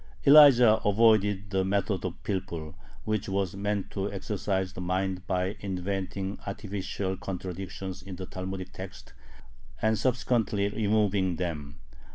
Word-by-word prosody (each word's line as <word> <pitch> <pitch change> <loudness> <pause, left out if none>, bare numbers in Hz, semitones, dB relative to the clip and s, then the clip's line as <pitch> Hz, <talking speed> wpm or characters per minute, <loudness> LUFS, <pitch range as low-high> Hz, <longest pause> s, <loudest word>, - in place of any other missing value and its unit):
Elijah 135 -6 +8
avoided 105 -2 +3
the 95 -1 +2
method 100 -1 0
of 90 -2 -3
pilpul, 85 -6 -4 0.3
which 110 -1 -1
was 95 -1 -1
meant 100 0 -2
to 100 0 -2
exercise 95 -1 -2
the 90 - -6
mind 90 0 -2
by 95 +1 0
inventing 95 0 -3
artificial 100 -1 -3
contradictions 95 0 -6
in 95 -2 -8
the 95 +1 -6
Talmudic 95 0 -6
text 95 0 -9 0.7
and 110 0 +1
subsequently 115 -5 +1
removing 105 -3 +1
them. 75 -5 -4
95 Hz, 125 wpm, -28 LUFS, 95-105 Hz, 0.7 s, Elijah